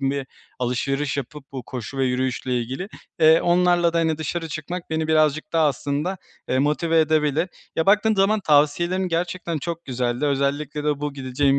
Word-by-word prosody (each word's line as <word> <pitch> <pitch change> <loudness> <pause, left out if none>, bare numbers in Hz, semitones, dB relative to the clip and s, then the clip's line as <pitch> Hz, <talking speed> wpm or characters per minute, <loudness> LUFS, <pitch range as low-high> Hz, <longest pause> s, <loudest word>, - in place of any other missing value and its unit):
bir 140 -1 -3 0.3
alışveriş 135 +3 -1
yapıp 140 +1 -7
bu 130 -2 -5
koşu 125 +2 -7
ve 135 - +2
yürüyüşle 125 0 -1
ilgili, 130 +11 -4 0.3
eee, 160 +1 +7
onlarla 175 -1 +3
da 170 - +1
hani 160 -1 +1
dışarı 165 +1 -3
çıkmak 165 +3 -6
beni 160 0 0
birazcık 155 +3 +2
daha 160 -2 +4
aslında, 145 +6 -1 0.3
eee, 130 - +1
motive 160 +3 +2
edebilir. 155 +2 +1 0.3
Ya, 160 - +1
baktığın 215 +2 +4
zaman 205 +2 +3
tavsiyelerin 170 +4 +2
gerçekten 170 -1 -2
çok 170 +2 -5
güzeldi. 125 +1 -1
Özellikle 140 +1 -1
de 150 -1 0
bu 145 -1 -2
gideceğim 135 +1 +1
150 Hz, 165 wpm, -23 LUFS, 135-170 Hz, 0.3 s, eee